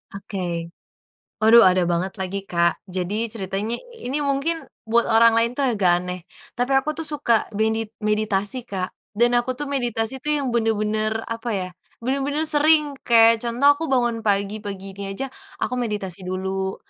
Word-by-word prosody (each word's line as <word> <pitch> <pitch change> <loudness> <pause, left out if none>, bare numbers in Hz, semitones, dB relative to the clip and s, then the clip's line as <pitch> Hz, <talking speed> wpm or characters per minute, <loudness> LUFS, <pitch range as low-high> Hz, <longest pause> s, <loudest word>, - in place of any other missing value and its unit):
Oke, 175 -4 -4 0.7
waduh 225 +1 +7
ada 185 -1 +4
banget 175 +2 -1
lagi, 190 +1 -2
Kak. 170 -2 +1
Jadi 200 +4 -3
ceritanya 205 +2 -3
i 470 - -9
ini 295 - 0
mungkin 290 +4 -1 0.2
buat 235 +1 +2
orang 230 0 +6
lain 230 +1 +2
tuh 270 -3 +1
agak 180 -4 +2
aneh. 180 0 -5 0.3
Tapi 245 +3 -1
aku 300 +3 +1
tuh 325 - 0
suka 235 -6 +1
medit 220 +1 0 0.2
meditasi, 210 +2 +1
Kak. 185 -3 -3 0.2
Dan 240 +2 +3
aku 255 +1 -4
tuh 295 - -3
meditasi 250 -3 -2
tuh 300 +3 0
yang 270 -4 -2
bener-bener, 215 -1 0
apa 230 +1 -5
ya, 185 -1 -3 0.4
bener-bener 280 +4 0
sering, 300 -1 +4 0.2
kayak 230 -1 +6
contoh 245 +5 +4
aku 290 +3 -5
bangun 240 -3 +1
pagi, 205 0 0
pagi 195 -2 -7
ini 195 0 -6
aja, 270 +2 -5 0.3
aku 250 - -3
meditasi 205 -6 -3
dulu. 190 +1 -2
225 Hz, 165 wpm, -22 LUFS, 195-255 Hz, 0.7 s, waduh